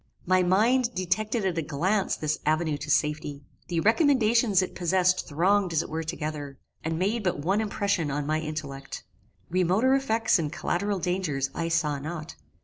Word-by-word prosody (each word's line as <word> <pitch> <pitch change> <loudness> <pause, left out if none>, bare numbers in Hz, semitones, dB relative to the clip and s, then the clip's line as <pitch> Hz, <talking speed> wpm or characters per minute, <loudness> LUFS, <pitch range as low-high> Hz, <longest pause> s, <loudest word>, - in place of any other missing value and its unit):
My 185 +1 +3
mind 230 +7 +2
detected 200 +4 -1
at 175 -3 0
a - - 0
glance 185 +8 0
this 155 0 -2
avenue 155 0 +1
to - - -7
safety. 150 -1 0 0.2
The 170 -2 -1
recommendations 230 - +3
it - - -5
possessed 185 +1 +1
thronged 180 +4 +2
as 160 - +2
it - - -10
were 160 +1 -2
together, 150 -3 -5 0.3
and 160 0 -2
made 205 +6 0
but 180 -4 0
one 190 +9 0
impression 200 -6 -1
on 145 +1 -2
my 155 +1 0
intellect. 150 -3 -6 0.5
Remoter 185 +9 +3
effects 230 -7 +2
and 150 -3 -2
collateral 200 +4 -1
dangers 165 -7 -1
I 165 - -2
saw 150 -4 0
not. 155 +2 -6
175 Hz, 165 wpm, -27 LUFS, 155-205 Hz, 0.5 s, My